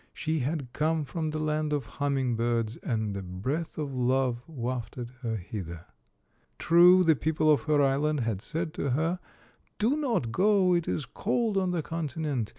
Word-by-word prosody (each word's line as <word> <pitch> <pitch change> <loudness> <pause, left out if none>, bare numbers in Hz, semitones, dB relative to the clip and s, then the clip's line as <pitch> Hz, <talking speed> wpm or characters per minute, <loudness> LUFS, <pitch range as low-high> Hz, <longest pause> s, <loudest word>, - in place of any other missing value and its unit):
She 160 0 -1
had 135 -2 -3
come 155 0 0
from 160 +2 -3
the 155 - -3
land 155 0 -1
of 145 -2 -1
humming 135 -4 -1
birds, 115 -1 0
and 110 -4 -2
a 100 - -3
breath 115 - -4
of 145 -3 -3
love 125 -1 +1
wafted 125 -4 -4
her 115 -3 -2
hither. 90 -4 -6 0.7
True, 175 +2 +6
the 160 -2 +5
people 155 +1 +2
of 145 - -1
her 150 -2 +3
island 140 +1 +1
had 110 -4 -2
said 165 +5 -4
to 140 - -2
her, 165 +3 0 0.3
" - - -37
Do 230 +7 +2
not 240 - 0
go. 190 - +3
It 170 -1 +1
is 145 - -1
cold 225 0 -1
on 190 -1 +1
the 175 -3 -1
continent. 150 -7 -3
150 Hz, 175 wpm, -28 LUFS, 120-165 Hz, 0.7 s, True